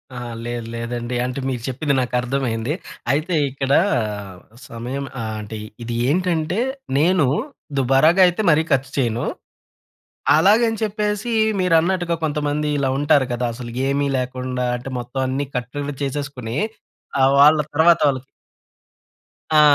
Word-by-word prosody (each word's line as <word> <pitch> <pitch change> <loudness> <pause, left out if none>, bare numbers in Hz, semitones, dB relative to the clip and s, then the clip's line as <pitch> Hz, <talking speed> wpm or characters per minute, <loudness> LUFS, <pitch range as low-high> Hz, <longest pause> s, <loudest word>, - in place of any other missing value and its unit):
అహా! 120 -1 -5 0.2
లేదు, 120 -1 -4
లేదండి. 120 +1 -4
అంటే, 125 +2 -3
మీరు 125 -2 -3
చెప్పింది 140 +3 -1
నాకర్థమైంది. 125 0 -1 0.4
అయితే, 155 +5 0
ఇక్కడా 135 +1 +2 0.9
సమయం 125 +4 -5 0.2
ఆహ్, 110 -1 -4
అంటే, 110 +1 -7 0.3
ఇది 115 0 -4
ఏంటంటే, 175 +2 0 0.4
నేను 165 +1 +3 0.5
దుబారాగా 135 +8 +4
అయితే 180 +5 0
మరీ 150 - +4
ఖచ్చు 135 0 +1
చెయను. 120 -3 0 1.1
అలాగని 220 +7 +4
చెప్పేసీ 210 +1 -1 0.3
మీరన్నట్టుగా 175 0 +2
కొంతమంది 150 0 -1
ఇలా 135 -1 +1
ఉంటారు 145 -2 +3
కదా! 120 0 -1
అసలుకేమి 130 +4 -1
లేకుండా. 125 0 -3
అంటే, 125 +2 -7
మొత్తం 125 +2 -4
అన్ని 135 +2 -1
కట్టడిని 140 +4 -4
చేసేసుకొని 135 -4 -4 0.6
ఆహ్, 135 +1 +5
వాళ్ళ 150 +2 +8 0.2
తర్వాతోళ్ళకి 145 -4 +3 1.3
ఆ! - - +8
140 Hz, 115 wpm, -21 LUFS, 125-155 Hz, 1.3 s, వాళ్ళ